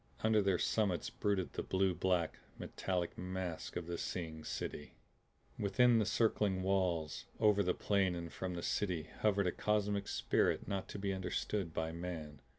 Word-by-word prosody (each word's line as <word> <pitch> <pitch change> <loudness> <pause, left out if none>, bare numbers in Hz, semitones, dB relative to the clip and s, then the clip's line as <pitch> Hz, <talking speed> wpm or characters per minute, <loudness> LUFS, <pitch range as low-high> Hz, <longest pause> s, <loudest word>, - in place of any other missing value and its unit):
Under 110 -1 +4
their 95 -2 +2
summits 95 -4 +1
brooded 95 -6 0
the - - -2
blue 95 0 +1
black, 90 -1 0 0.2
metallic 90 -3 -2
mass 90 -2 -3
of 90 - -3
the 85 0 -4
Seeing 80 -3 -4
City. 75 - -5 0.6
Within 115 +3 +4
circling 105 -3 +2
walls, 90 -5 0
over 105 -2 +5
plain 100 -3 +2
and 85 -1 -6
from 90 -1 -3
the 85 - -4
City 90 -6 -1
hovered 100 -2 +3
a 90 - +2
cosmic 105 -1 0
spirit - - +1
not 95 -1 -2
to - - -6
be 100 0 -1
understood 95 0 -2
by 80 0 -2
man. 80 -4 -6
95 Hz, 155 wpm, -36 LUFS, 85-100 Hz, 0.6 s, over